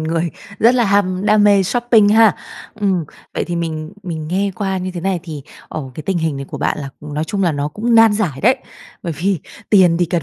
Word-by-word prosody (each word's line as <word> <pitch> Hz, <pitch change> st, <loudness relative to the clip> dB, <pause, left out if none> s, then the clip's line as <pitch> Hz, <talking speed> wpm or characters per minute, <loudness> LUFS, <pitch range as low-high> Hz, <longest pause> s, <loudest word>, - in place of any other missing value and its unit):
người 165 Hz, +1 st, -1 dB, 0.3 s
rất 235 Hz, +3 st, +5 dB
là 245 Hz, -2 st, +3 dB
ham 195 Hz, -2 st, +1 dB
đam 210 Hz, 0 st, +4 dB
mê 200 Hz, -2 st, +5 dB
shopping 235 Hz, 0 st, +3 dB
ha. 220 Hz, 0 st, +5 dB, 0.4 s
Ừm, 195 Hz, -5 st, 0 dB, 0.3 s
vậy -, -, -1 dB
thì 175 Hz, 0 st, -3 dB
mình 160 Hz, -1 st, -4 dB
mình 160 Hz, -4 st, -5 dB
nghe 195 Hz, +3 st, 0 dB
qua 195 Hz, -3 st, -2 dB
như 185 Hz, 0 st, -4 dB
thế 180 Hz, -1 st, -6 dB
này 190 Hz, 0 st, -1 dB
thì, 155 Hz, -5 st, -7 dB, 0.3 s
ờ, 155 Hz, -, -5 dB
cái 155 Hz, -, -7 dB
tình 180 Hz, +2 st, -1 dB
hình 160 Hz, -3 st, -1 dB
này 140 Hz, -, -5 dB
của -, -, -6 dB
bạn -, -, -1 dB
là, 140 Hz, -, -5 dB
nói 150 Hz, +1 st, -4 dB
chung 195 Hz, +5 st, -2 dB
là 175 Hz, -3 st, +2 dB
nó 145 Hz, 0 st, -2 dB
cũng 230 Hz, +9 st, -1 dB
nan 225 Hz, -1 st, +7 dB
giải 180 Hz, -11 st, -1 dB
đấy. 255 Hz, +6 st, +4 dB, 0.5 s
Bởi 170 Hz, -3 st, -3 dB
vì 185 Hz, +3 st, 0 dB, 0.3 s
tiền 185 Hz, -5 st, +5 dB
thì 175 Hz, -, +2 dB
cần 170 Hz, -1 st, -1 dB
185 Hz, 235 wpm, -18 LUFS, 160-205 Hz, 0.5 s, nan